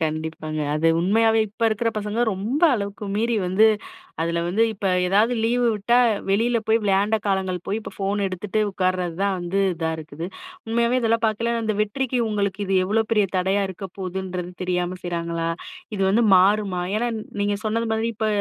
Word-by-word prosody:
கண்டிப்பாங்க. 155 0 -3
அது 155 +2 +1
உண்மையாவே 225 +5 +3
இப்ப 215 +3 -9
இருக்கிற 220 +1 0
பசங்க 210 +2 -2
ரொம்ப 220 - -2
அளவுக்கு 200 -1 -4
மீறி 230 +1 +1
வந்து, 190 +5 +4 0.5
அதில 170 +1 0
வந்து 200 +6 +2
இப்ப 200 -1 -4 0.2
ஏதாவது 215 +6 +3
லீவு 240 +1 +2
விட்டா, 215 +4 +2 0.3
வெளில 230 +4 +2
போய் 225 +1 +4
விளையாண்ட 200 +2 +2
காலங்கள் 190 -2 0
போய், 205 - -1
இப்போ - - -9
ஃபோன் 200 +1 -1
எடுத்துட்டு 190 +3 -2
உட்கார்றது 185 -2 -1
தான் 200 -1 +1
வந்து 175 +3 -1
இதா 165 -1 -2
இருக்குது. 160 +2 -7 0.4
உண்மையாவே 235 +2 +2
இதெல்லாம் 230 0 +1
பார்க்கைல 230 +2 0
அந்த 215 -1 0
வெற்றிக்கு 255 +4 -2
உங்களுக்கு 205 -2 -1
இது 190 0 +1
எவ்ளோ 220 +3 +2
பெரிய 210 -3 +3
தடையா 190 +2 +1
இருக்க 190 +1 -8
போகுதுன்றது 185 -1 -4
தெரியாம 180 0 -1
செய்றாங்களா! 170 -1 -2 0.5
இது 195 - -1
வந்து 225 +4 +3
மாறுமா? 190 -1 +3
ஏன்னா, 240 +2 0 0.3
நீங்க 205 0 +1
சொன்னது 225 +1 0
மாதிரி 220 +1 0
இப்ப 220 - -1
200 Hz, 165 wpm, -23 LUFS, 180-220 Hz, 0.5 s, வந்து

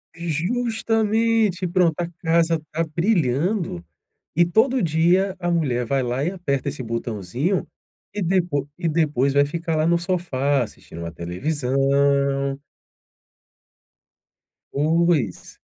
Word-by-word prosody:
Justamente. 220 +3 0
Pronto, 170 -3 +2
a 175 - -1
casa 165 -1 +2
tá 165 +2 0
brilhando, 170 - 0 0.5
e 175 +1 +5
todo 235 +8 +2
dia 175 +4 +2
a 175 - -1
mulher 130 -8 0
vai 135 +2 0
lá 125 +3 -1
e 175 - 0
aperta 140 -8 -2
esse 130 - -6
botãozinho, 115 - -2 0.5
e 210 - -3
depo 170 -6 0
e 175 -2 -2
depois 150 -4 +1
vai 140 0 +5
ficar, 165 +2 -3
lá, 155 +1 +2
no 170 - +4
sofá, 145 -7 0
assistindo 95 -6 -11
uma 85 0 -5
televisão. 140 - 0 2.1
Pois. 155 - +1
160 Hz, 115 wpm, -22 LUFS, 135-180 Hz, 2.1 s, e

